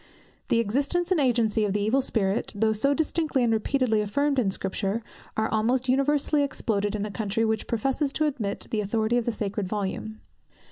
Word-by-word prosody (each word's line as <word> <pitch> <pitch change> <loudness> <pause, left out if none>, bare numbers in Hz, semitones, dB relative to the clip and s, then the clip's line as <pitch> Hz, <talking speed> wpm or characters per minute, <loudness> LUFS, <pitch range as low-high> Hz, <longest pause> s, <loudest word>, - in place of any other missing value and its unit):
The - - +2
existence 280 - 0
and 365 - +3
agency 230 -4 +2
of 205 -2 0
the 205 - 0
Evil 225 +7 +2
Spirit, 210 -5 0
though 220 +1 +2
so 245 +7 +2
distinctly 315 -4 0
and 230 -1 +2
repeatedly 225 0 +1
affirmed 275 +7 +1
in 215 -6 +2
Scripture, 195 +3 -2 0.3
are 220 0 +2
almost 240 +4 +1
universally 285 +3 +2
exploded 215 -7 -1
in 205 0 -2
a 210 - -5
country 215 +2 -1
which 220 0 -1
professes 270 +5 0
to 310 - +1
admit 240 -9 -2
the 215 - 0
authority 220 +3 0
of 240 - 0
the 235 - +1
sacred 205 -2 -3
volume. 210 +2 -4
225 Hz, 185 wpm, -26 LUFS, 210-270 Hz, 0.3 s, and